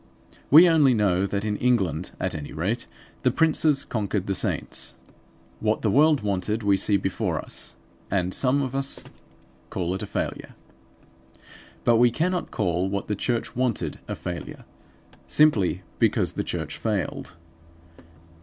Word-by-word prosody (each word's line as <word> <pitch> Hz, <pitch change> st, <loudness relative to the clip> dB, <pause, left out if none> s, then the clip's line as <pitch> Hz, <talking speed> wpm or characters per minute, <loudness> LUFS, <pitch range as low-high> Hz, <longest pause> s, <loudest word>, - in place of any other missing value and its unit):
We 165 Hz, +5 st, +9 dB
only 150 Hz, -7 st, +5 dB
know 100 Hz, -3 st, +2 dB
that 100 Hz, +1 st, -2 dB
in 105 Hz, -1 st, -1 dB
England 95 Hz, -, +1 dB
at -, -, -1 dB
any 75 Hz, -2 st, -6 dB
rate 100 Hz, +10 st, -2 dB, 0.3 s
the -, -, +3 dB
princes 155 Hz, -3 st, +2 dB
conquered 105 Hz, -3 st, -2 dB
the 100 Hz, -, -1 dB
saints. -, -, -2 dB, 0.6 s
What 110 Hz, 0 st, 0 dB
the 110 Hz, -, +2 dB
world 150 Hz, +1 st, +4 dB
wanted 105 Hz, +2 st, -1 dB
we 100 Hz, -1 st, +4 dB
see 100 Hz, +1 st, +2 dB
before 95 Hz, -1 st, -2 dB
us; -, -, -4 dB, 0.3 s
and 95 Hz, -1 st, 0 dB
some 140 Hz, +2 st, +2 dB
of 130 Hz, -1 st, -4 dB
us 135 Hz, 0 st, -1 dB, 0.7 s
call 90 Hz, -1 st, -2 dB
it 95 Hz, -, -4 dB
a -, -, -4 dB
failure. -, -, -4 dB, 1.3 s
But 120 Hz, -1 st, +4 dB
we 120 Hz, +1 st, +6 dB
cannot 175 Hz, +8 st, -1 dB
call 90 Hz, -2 st, 0 dB
what 100 Hz, +1 st, -3 dB
the 105 Hz, -, 0 dB
church 120 Hz, +3 st, -2 dB
wanted 115 Hz, -11 st, -1 dB
a -, -, -3 dB
failure, 85 Hz, -1 st, -7 dB, 0.6 s
simply 100 Hz, -12 st, +3 dB, 0.2 s
because -, -, +2 dB
the -, -, -2 dB
church -, -, -4 dB
failed. 100 Hz, -6 st, -3 dB
105 Hz, 145 wpm, -25 LUFS, 95-130 Hz, 1.3 s, We